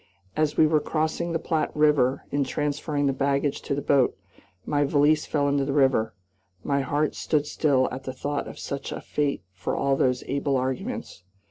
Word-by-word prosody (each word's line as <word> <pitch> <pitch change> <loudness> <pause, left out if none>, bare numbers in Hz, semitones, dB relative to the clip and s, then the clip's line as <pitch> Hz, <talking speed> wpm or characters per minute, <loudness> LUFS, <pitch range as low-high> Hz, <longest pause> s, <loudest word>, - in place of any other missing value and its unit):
As 155 -1 0
we 160 - +6
were 155 0 +3
crossing 160 +3 -1
the 165 - +1
Platte 160 -1 -1
River, 145 -3 +3
in 145 0 +1
transferring 145 +1 -1
the 135 - +2
baggage 140 +1 0
to 140 - -2
the 145 - -3
boat, 135 -3 +3 0.5
my 145 -1 +1
valise 145 +2 +3
fell 145 -2 +1
into 140 0 +2
the 135 0 -2
river. 130 -6 +2 0.5
My 140 -1 +1
heart 145 +2 0
stood 150 -2 0
still 140 -3 +2
at 130 +1 -7
the 130 - -3
thought 145 +2 -3
of - - -9
such 140 0 -5
a - - -4
fate 145 - -2
for 95 - -3
all 140 0 +1
those 125 -1 +1
able 140 0 0
arguments. 130 -7 -4
140 Hz, 190 wpm, -25 LUFS, 135-150 Hz, 0.5 s, we